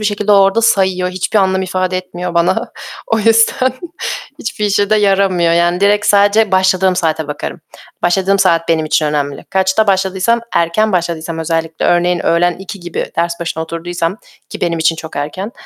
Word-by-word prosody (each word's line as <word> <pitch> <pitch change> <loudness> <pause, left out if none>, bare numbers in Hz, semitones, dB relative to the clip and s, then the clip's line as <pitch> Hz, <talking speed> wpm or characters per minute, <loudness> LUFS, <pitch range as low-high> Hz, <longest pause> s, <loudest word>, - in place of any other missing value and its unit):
bir 215 - -4
şekilde 205 0 +1
o - - +6
orada 195 +4 +3
sayıyor, 190 -4 +2
hiçbir 185 +3 -1
anlam 190 -1 +1
ifade 185 0 -2
etmiyor 180 -1 -5
bana. 170 +2 0 0.3
O 225 - 0
yüzden 225 +4 +3 0.7
hiçbir 210 -4 -4
işe 205 0 +1
de 215 - +4
yaramıyor, 195 -4 +2
yani 175 +1 +1
direkt 205 +1 +2
sadece 205 0 +3
başladığım 185 0 +2
saate 160 -3 -1
bakarım. 150 - -6 0.4
Başladığım 190 +3 +2
saat 165 -3 +2
benim 160 -1 +1
için 155 0 +1
önemli. 145 -2 -2
Kaçta 190 +3 +1
başladıysam, 190 +4 +1
erken 170 +6 +1
başladıysam 170 -2 -2
özellikle, 165 0 -2
örneğin 175 0 +1
öğlen 175 +1 +2
2 190 +1 -8
gibi 175 -1 -4
ders 170 +1 -1
başına 165 -1 -3
oturduysam, 170 +2 -3 0.3
ki 210 - -9
benim 170 -2 -1
için 160 0 +1
çok 160 -2 -9
erken, 185 +10 -4
185 Hz, 170 wpm, -15 LUFS, 170-200 Hz, 0.7 s, o